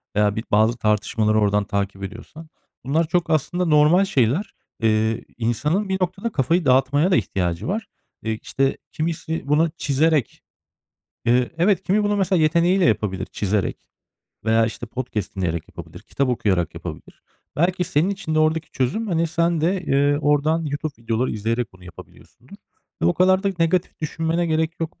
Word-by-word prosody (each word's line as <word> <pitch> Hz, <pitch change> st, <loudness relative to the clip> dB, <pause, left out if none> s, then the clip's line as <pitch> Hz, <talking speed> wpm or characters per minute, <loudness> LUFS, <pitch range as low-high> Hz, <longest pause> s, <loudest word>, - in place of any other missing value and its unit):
veya 105 Hz, -1 st, +2 dB
bir 110 Hz, -, -3 dB
bazı 110 Hz, +3 st, +3 dB
tartışmaları 110 Hz, 0 st, +1 dB
oradan 105 Hz, 0 st, +2 dB
takip 100 Hz, -1 st, -3 dB
ediyorsan 115 Hz, +11 st, -9 dB, 0.4 s
bunlar 155 Hz, +4 st, +1 dB
çok 175 Hz, 0 st, 0 dB
aslında 175 Hz, +4 st, 0 dB
normal 155 Hz, +5 st, +5 dB
şeyler. 135 Hz, -, 0 dB, 0.3 s
Eee, 110 Hz, 0 st, +1 dB
insanın 150 Hz, -, 0 dB
bir 190 Hz, -, 0 dB
noktada 190 Hz, +5 st, -2 dB
kafayı 160 Hz, +4 st, +1 dB
dağıtmaya 145 Hz, +7 st, +3 dB
da -, -, +5 dB
ihtiyacı 90 Hz, -, -1 dB
var. 220 Hz, +4 st, -2 dB, 0.4 s
Eee, 110 Hz, 0 st, -2 dB
işte 135 Hz, 0 st, 0 dB
kimisi 160 Hz, -1 st, -3 dB
bunu 155 Hz, +3 st, +3 dB
çizerek, 145 Hz, -2 st, +1 dB, 0.9 s
ııı, 125 Hz, +1 st, +3 dB
evet 185 Hz, +3 st, +2 dB
kimi 205 Hz, +3 st, +1 dB
bunu 205 Hz, 0 st, +1 dB
mesela 185 Hz, -3 st, +2 dB
yeteneği 170 Hz, +4 st, +3 dB
ile 190 Hz, -, +3 dB
yapabilir 100 Hz, -5 st, 0 dB
çizerek 100 Hz, 0 st, -2 dB, 0.6 s
veya 115 Hz, 0 st, +3 dB
işte 115 Hz, +1 st, -6 dB
podcast 110 Hz, -5 st, -5 dB
dinleyerek 85 Hz, -3 st, -2 dB
yapabilir, -, -, -11 dB
kitap 140 Hz, -2 st, -2 dB
okuyarak 95 Hz, -8 st, 0 dB
yapabilir. -, -, -9 dB, 0.3 s
Belki 180 Hz, +3 st, +1 dB
senin 160 Hz, +6 st, +1 dB
için 160 Hz, -5 st, -4 dB
de -, -, +2 dB
oradaki 155 Hz, 0 st, +1 dB
çözüm, 135 Hz, -, -1 dB
hani, 170 Hz, -1 st, +1 dB
sen 170 Hz, 0 st, 0 dB
de, 180 Hz, +3 st, 0 dB
eee, 145 Hz, 0 st, +2 dB
oradan 150 Hz, +3 st, +2 dB
YouTube 145 Hz, +1 st, -3 dB
videoları 115 Hz, +2 st, 0 dB
izleyerek 115 Hz, 0 st, -2 dB
bunu 90 Hz, -1 st, -17 dB
yapabiliyorsundur 90 Hz, -, -15 dB, 0.5 s
ve -, -, +3 dB
o 85 Hz, -, +4 dB
kadar 185 Hz, +1 st, +3 dB
da 200 Hz, -, +1 dB
negatif 170 Hz, +2 st, 0 dB
düşünmene 165 Hz, +2 st, -1 dB
gerek 160 Hz, +2 st, -1 dB
yok 165 Hz, 0 st, -5 dB
150 Hz, 160 wpm, -22 LUFS, 110-170 Hz, 0.9 s, normal